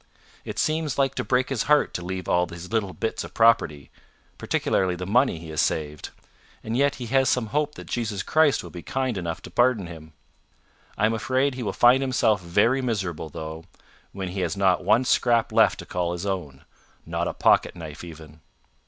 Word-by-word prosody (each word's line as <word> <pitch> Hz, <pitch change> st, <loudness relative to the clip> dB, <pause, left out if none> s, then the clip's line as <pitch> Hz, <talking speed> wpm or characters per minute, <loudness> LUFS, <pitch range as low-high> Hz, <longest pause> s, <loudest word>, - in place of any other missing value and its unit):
It -, -, -7 dB
seems 155 Hz, -3 st, 0 dB
like 135 Hz, -1 st, +2 dB
to -, -, -3 dB
break 130 Hz, 0 st, +1 dB
his 135 Hz, -5 st, -1 dB
heart 150 Hz, 0 st, +4 dB
to 90 Hz, -, -4 dB
leave 95 Hz, +1 st, -5 dB
all 90 Hz, 0 st, +2 dB
his 85 Hz, +1 st, -10 dB
little 105 Hz, -4 st, 0 dB
bits 115 Hz, -, -3 dB
of -, -, -11 dB
property 85 Hz, -, +3 dB, 0.5 s
particularly 95 Hz, -2 st, 0 dB
the 90 Hz, +1 st, -5 dB
money 120 Hz, +1 st, +2 dB
he 80 Hz, 0 st, -10 dB
has 75 Hz, -, 0 dB
saved; 75 Hz, -1 st, -2 dB, 0.5 s
and 110 Hz, -, -3 dB
yet 140 Hz, +2 st, +2 dB
he 125 Hz, -, -6 dB
has 135 Hz, +3 st, +2 dB
some 125 Hz, -3 st, +1 dB
hope 150 Hz, 0 st, 0 dB
that -, -, -9 dB
Jesus 110 Hz, -5 st, -3 dB
Christ 155 Hz, -3 st, +3 dB
will -, -, -10 dB
be 85 Hz, -, -8 dB
kind 130 Hz, +4 st, -2 dB
enough 85 Hz, -3 st, -4 dB
to -, -, -10 dB
pardon 120 Hz, -5 st, +2 dB
him. 80 Hz, -2 st, -11 dB, 0.8 s
I 105 Hz, -, +2 dB
am 110 Hz, -, +2 dB
afraid 130 Hz, +4 st, 0 dB
he 125 Hz, -, -6 dB
will 115 Hz, -, -2 dB
find 125 Hz, +2 st, +5 dB
himself 120 Hz, -6 st, +2 dB
very 100 Hz, +10 st, +2 dB
miserable 95 Hz, -10 st, -3 dB
though, 80 Hz, +2 st, -7 dB, 0.5 s
when 95 Hz, -2 st, -5 dB
he 95 Hz, +2 st, -5 dB
has 90 Hz, 0 st, -2 dB
not 95 Hz, -2 st, +2 dB
one 110 Hz, +7 st, +3 dB
scrap 120 Hz, -2 st, +2 dB
left -, -, +4 dB
to -, -, -8 dB
call 85 Hz, -1 st, -2 dB
his 90 Hz, +3 st, -5 dB
own 85 Hz, -9 st, -4 dB, 0.4 s
not -, -, -2 dB
a -, -, -3 dB
pocket -, -, +3 dB
knife 80 Hz, -2 st, -9 dB
even." 80 Hz, -2 st, -12 dB
100 Hz, 200 wpm, -25 LUFS, 85-125 Hz, 0.8 s, find